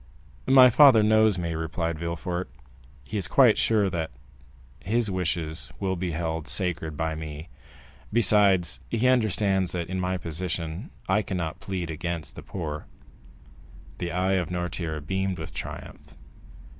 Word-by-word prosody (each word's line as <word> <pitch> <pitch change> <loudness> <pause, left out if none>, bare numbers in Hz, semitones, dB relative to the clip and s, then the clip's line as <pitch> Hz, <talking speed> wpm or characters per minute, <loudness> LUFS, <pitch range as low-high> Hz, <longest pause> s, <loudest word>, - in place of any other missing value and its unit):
"My 130 -2 +8
father 130 -4 +7
knows 110 -2 +4
me," 85 -2 -2
replied 80 0 -3
Villefort; 85 +2 -3 0.5
"he 105 - -5
is 100 - -1
quite 125 -6 +5
sure 105 -3 +3
that 80 -2 -2 0.7
his 110 +2 0
wishes 85 -3 -1
will 95 -1 -1
be 90 0 -3
held 80 -1 -3
sacred 80 -5 -1
by 80 0 -1
me; 80 0 -7 0.6
besides, 100 -6 +4
he 115 +2 +1
understands 105 -6 +2
that 85 -2 -3
in 95 0 -2
my 90 0 -1
position 85 - -4 0.2
I 95 +3 +3
cannot 90 -6 -4
plead 90 -4 -4
against 85 0 -4
the - - -8
poor." 75 -5 -6 1.1
The 85 - -3
eye 90 +3 +1
of 85 - -5
Noirtier 85 -3 -3
beamed 95 +2 -1
with 80 -3 -7
triumph. 75 +1 -8
90 Hz, 140 wpm, -26 LUFS, 80-100 Hz, 1.1 s, My